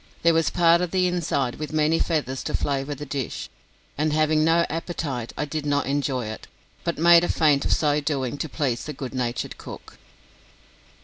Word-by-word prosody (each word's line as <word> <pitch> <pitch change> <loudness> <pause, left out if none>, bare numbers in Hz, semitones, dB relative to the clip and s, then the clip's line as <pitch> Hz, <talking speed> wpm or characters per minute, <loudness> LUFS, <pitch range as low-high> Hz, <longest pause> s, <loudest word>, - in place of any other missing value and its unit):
There 170 0 +5
was 165 0 +2
part 170 0 +4
of 180 - -1
the 185 +1 +1
inside 155 -8 -1
with 155 0 -5
many 155 +1 +2
feathers 135 -6 -1
to - - -2
flavour 140 0 -1
the 145 +2 -7
dish, 135 -3 -4 0.5
and 155 +1 +1
having 155 0 +2
no 165 +1 +4
appetite, 155 -7 -4
I 150 - -1
did 150 +1 -4
not 145 -1 0
enjoy 135 -2 -1
it, 110 0 -7 0.4
but - - -2
made 170 +2 +6
a - - 0
feint 150 -4 +3
of - - 0
so 150 -1 +2
doing 140 -3 -2
to 160 - -3
please 130 -6 -2
the 150 - -5
good 130 -2 -6
natured 120 -2 -3
cook. - - -11
150 Hz, 190 wpm, -24 LUFS, 135-165 Hz, 0.5 s, made